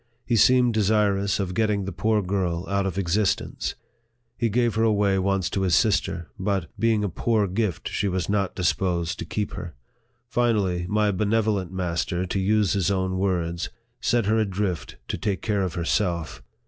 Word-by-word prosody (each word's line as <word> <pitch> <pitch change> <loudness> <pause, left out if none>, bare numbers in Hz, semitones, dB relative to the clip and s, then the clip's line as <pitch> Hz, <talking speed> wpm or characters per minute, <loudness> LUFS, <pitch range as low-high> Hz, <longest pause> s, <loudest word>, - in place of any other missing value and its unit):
He 120 - +1
seemed 125 +1 +5
desirous 100 -2 +2
of 95 -2 -2
get 110 +3 +2
ting 100 -2 -1
the 95 - -4
poor 105 +3 +1
girl 90 -2 -1
out 100 0 0
of 95 -1 -4
existence. 100 +2 0 0.6
He 115 - 0
gave 120 +1 +1
her 110 - 0
away 100 -3 +3
once 95 -1 +1
to 100 - -1
his 90 -3 +3
sister; 85 - +1
but, 95 -3 -1
being 110 -1 +2
a - - +1
poor 105 +4 +1
gift, 95 -2 -2
she 100 - -1
was 95 -2 -1
not 100 -2 0
disposed 85 -1 0
to - - -4
keep 105 -1 -3
her. 85 -2 -7 0.5
Finally, 105 -8 +1
my 105 0 +2
benevolent 105 -2 0
master, 90 -1 -1
to 95 +2 -2
use 105 +1 +2
his 100 -3 +1
own 95 -1 0
words, 85 -3 -1 0.2
" 120 +1 -46
set 120 -3 +2
her 110 +2 +2
adrift 95 -4 -2
to - - -3
take 100 -3 -2
care 105 -3 0
of 90 -4 -2
herself." 85 -1 -1
100 Hz, 180 wpm, -25 LUFS, 90-105 Hz, 0.6 s, seemed